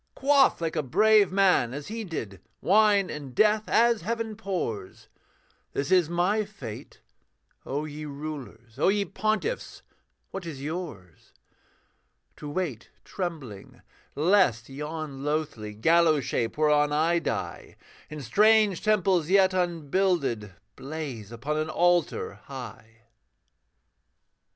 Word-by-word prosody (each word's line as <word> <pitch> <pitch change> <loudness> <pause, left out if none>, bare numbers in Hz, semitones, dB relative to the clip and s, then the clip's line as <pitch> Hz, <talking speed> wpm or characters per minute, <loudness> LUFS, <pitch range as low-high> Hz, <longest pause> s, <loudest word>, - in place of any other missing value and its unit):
Quaff, 275 0 +4
like 165 -1 -2
a 155 - +1
brave 210 - +4
man, 185 -11 +3
as 145 0 -6
he 225 +1 -5
did, 110 - -6 0.2
Wine 205 0 +3
and 140 -4 -8
death 215 +3 +3
as 235 -1 +3
heaven 225 +3 -3
pours 180 - -5 0.6
This 140 +6 -2
is 180 -4 +4
my 180 +5 +1
fate: 140 - -10 0.7
O 145 +3 -2
ye 150 0 -7
rulers, 140 -6 -8
O - - +3
ye 200 +1 +2
pontiffs, 215 - -2 0.5
what 195 - -5
is 150 -5 -6
yours? 140 - -7 1.0
To 150 - -7
wait 145 -8 -4 0.2
trembling, 150 - -6 0.3
lest 155 - +3
yon 150 0 -6
loathly 145 -9 -3
Gallows 160 +4 +3
shape 115 +3 -2
whereon 150 -1 +3
I 165 +3 +2
die, - - -4 0.3
In 150 -1 -7
strange 210 - +4
temples 190 -6 +2
yet 190 -1 +4
unbuilded, 165 - 0 0.2
Blaze 135 -8 -6
upon 135 +6 -3
an 155 0 -1
altar 175 - +1
high. 115 -4 -10
160 Hz, 115 wpm, -27 LUFS, 135-195 Hz, 1.0 s, Quaff